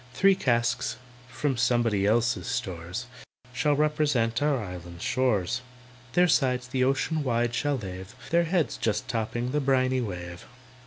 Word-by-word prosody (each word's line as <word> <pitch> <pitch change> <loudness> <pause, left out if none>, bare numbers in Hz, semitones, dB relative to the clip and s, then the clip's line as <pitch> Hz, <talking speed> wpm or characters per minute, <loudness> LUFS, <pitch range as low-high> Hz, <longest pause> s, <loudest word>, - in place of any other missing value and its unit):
"Three 195 +5 +5
casks, 125 -6 0 0.3
from 135 0 -1
somebody 120 -5 +2
else's 120 +3 +1
stores, 100 -4 -4 0.5
Shall 145 +3 +2
represent 145 -6 +1
our 145 -1 +2
island 90 -5 -7
shores, 120 -2 +1 0.5
Their 180 0 +5
sides 125 -5 +2
the 130 0 0
ocean 135 +4 +1
wide 120 -2 0
shall 145 +3 0
lave, 95 -3 -8 0.2
Their 170 +1 +4
heads 170 -2 0
just 110 - -1
topping 120 +2 -2
the 150 +1 +1
briny 130 -1 +2
wave. 90 -5 -6
125 Hz, 140 wpm, -27 LUFS, 110-140 Hz, 0.5 s, Three